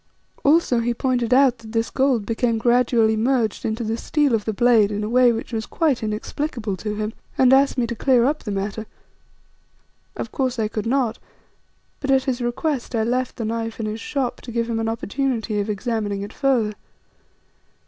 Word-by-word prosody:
Also 285 -5 +4
he 235 +1 -1
pointed 250 -2 0
out 255 -2 +4
that 220 0 -11
this 225 0 0
gold 260 -6 +1
became 230 +1 0
gradually 235 -1 +3
merged 230 -1 0
into 225 +2 -2
the 220 +1 -2
steel 295 0 +1
of 215 -2 0
the 220 - 0
blade 220 -1 +4
in 210 0 -2
a 210 - -2
way 250 0 +5
which 230 +1 -5
was 220 -1 -3
quite 305 -7 +1
inexplicable 220 +1 -3
to 210 +3 -4
him, 215 +1 -3 0.2
and 260 0 +5
asked 275 0 +4
me 245 - +2
to 235 - -3
clear 245 0 +3
up 295 +3 0
the - - -6
matter. 200 +2 -3 1.3
Of - - -5
course 260 -3 -1
I 215 -2 0
could 215 +1 -3
not, 245 -2 0 0.8
but 275 - -4
at 265 -1 +4
his 255 -2 -2
request 240 +1 -2
I 220 - +1
left 250 +2 -1
the 230 - -4
knife 225 0 -3
in 220 - -2
his 215 +1 -4
shop 265 -2 -2
to 240 - -8
give 230 0 -1
him 230 -1 -1
an 225 0 -1
opportunity 225 -1 -2
of 205 +1 -2
examining 210 -2 -2
it 205 - -8
further. 250 -7 +1
235 Hz, 195 wpm, -22 LUFS, 220-255 Hz, 1.3 s, way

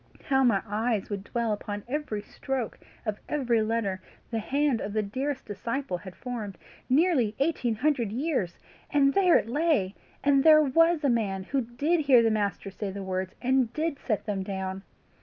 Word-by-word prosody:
How 270 -2 +2
my 230 -6 +3
eyes 215 0 -1
would 200 -1 -3
dwell 235 -3 -1
upon 205 0 -5
every 250 -7 -3
stroke 260 0 -4 0.3
of 215 -2 -2
every 245 -6 +1
letter 215 -4 -1 0.3
the 225 - 0
hand 275 +1 +1
of 200 - -4
the 215 0 +1
dearest 265 +6 -3
disciple 230 +2 -3
had 185 -2 -10
formed! 220 -7 -6 0.3
Nearly 265 - +3
eighteen 270 -6 0
hundred 250 -3 +1
years 255 - -1 0.3
and 275 -1 +3
there 370 -3 +5
it - - -2
lay! 270 - +1 0.3
and 275 -1 +4
there 310 -1 +8
WAS 330 +3 +3
a 280 - +3
man 200 -5 0
who 275 +7 -1
DID 280 +9 0
hear 270 -6 +5
the 225 - +3
Master 205 -2 -1
say 200 +1 -4
the 195 +1 -6
words, 185 0 -3
and 255 -2 +2
did 310 -2 -2
set 215 -5 -2
them 205 -3 -2
down! 190 -1 -4
235 Hz, 175 wpm, -27 LUFS, 205-280 Hz, 0.3 s, there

